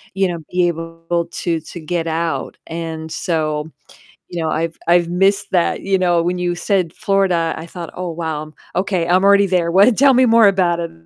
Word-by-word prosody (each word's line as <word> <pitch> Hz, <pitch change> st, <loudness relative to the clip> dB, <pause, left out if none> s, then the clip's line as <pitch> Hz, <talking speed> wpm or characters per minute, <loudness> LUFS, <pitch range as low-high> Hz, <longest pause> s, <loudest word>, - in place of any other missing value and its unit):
you 195 Hz, 0 st, +2 dB
know, 170 Hz, -2 st, -4 dB
be 180 Hz, -1 st, +2 dB
able 165 Hz, 0 st, -3 dB
to 165 Hz, -2 st, -2 dB
to 170 Hz, +2 st, -10 dB
get 165 Hz, +1 st, -2 dB
out, 165 Hz, 0 st, -2 dB
and 160 Hz, -1 st, -6 dB
so, 155 Hz, -3 st, -2 dB, 0.6 s
you 175 Hz, -, -5 dB
know, 160 Hz, -, -1 dB
I've 165 Hz, +1 st, -2 dB
I've 170 Hz, 0 st, +3 dB
missed 195 Hz, +3 st, +2 dB
that, 175 Hz, -2 st, +1 dB
you 195 Hz, 0 st, +1 dB
know, 175 Hz, -2 st, +2 dB
when 180 Hz, +1 st, -1 dB
you 175 Hz, 0 st, 0 dB
said 180 Hz, -2 st, -1 dB
Florida, 185 Hz, -4 st, 0 dB
I 160 Hz, -, -7 dB
thought, 170 Hz, -1 st, -8 dB
"Oh, 180 Hz, -1 st, -4 dB
wow, 155 Hz, -2 st, -5 dB, 0.2 s
okay, 185 Hz, -2 st, 0 dB
I'm 180 Hz, +2 st, +3 dB
already 200 Hz, 0 st, +5 dB
there, 175 Hz, -2 st, +1 dB
what 200 Hz, +6 st, +5 dB
tell 275 Hz, 0 st, +6 dB
me 255 Hz, +1 st, +5 dB
more 225 Hz, -2 st, +6 dB
about 180 Hz, -3 st, +2 dB
it, 170 Hz, -1 st, -4 dB
175 Hz, 195 wpm, -18 LUFS, 165-190 Hz, 0.6 s, tell